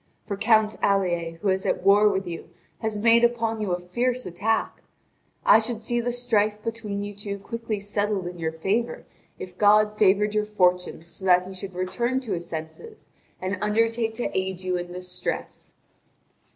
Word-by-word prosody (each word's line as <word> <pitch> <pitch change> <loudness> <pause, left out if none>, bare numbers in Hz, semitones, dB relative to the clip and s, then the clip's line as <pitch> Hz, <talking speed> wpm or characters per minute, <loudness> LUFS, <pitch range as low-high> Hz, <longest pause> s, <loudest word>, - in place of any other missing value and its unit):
For 200 - -3
Count 220 +1 +3
Alier, 175 -4 +1
who 200 - +2
is 190 0 +1
at - - -1
war 205 +2 +6
with 195 -1 -1
you, 170 -2 -7 0.3
has 220 -2 -2
made 230 +2 +5
upon 230 -2 +1
you 205 -3 -1
a 175 - 0
fierce 240 +8 -1
attack. 210 +6 -1 0.6
I - - +8
should 225 0 -4
see 240 +1 0
the 245 +1 -1
strife 215 -4 +1
between 215 -3 -4
you 205 0 -6
two 200 0 -5
quickly 225 +1 -4
settled 205 -1 -1
in 175 0 -6
your 160 -1 -1
favour 195 +9 -2 0.3
if 180 0 -9
God 210 0 +5
favoured 210 0 +3
your 210 0 +1
fortunes 180 -5 +1
so 190 - -8
that 180 0 +4
he 190 - -8
should 190 0 -8
return 235 +8 -1
to 235 -5 -7
his 175 -2 -3
senses 165 - -8 0.3
and 185 +1 -3
undertake 225 +1 +1
to 240 - -3
aid 190 -1 -2
you 185 -1 -1
in 175 0 -4
this 180 0 -7
stress." 180 0 -5
205 Hz, 180 wpm, -25 LUFS, 185-225 Hz, 0.6 s, I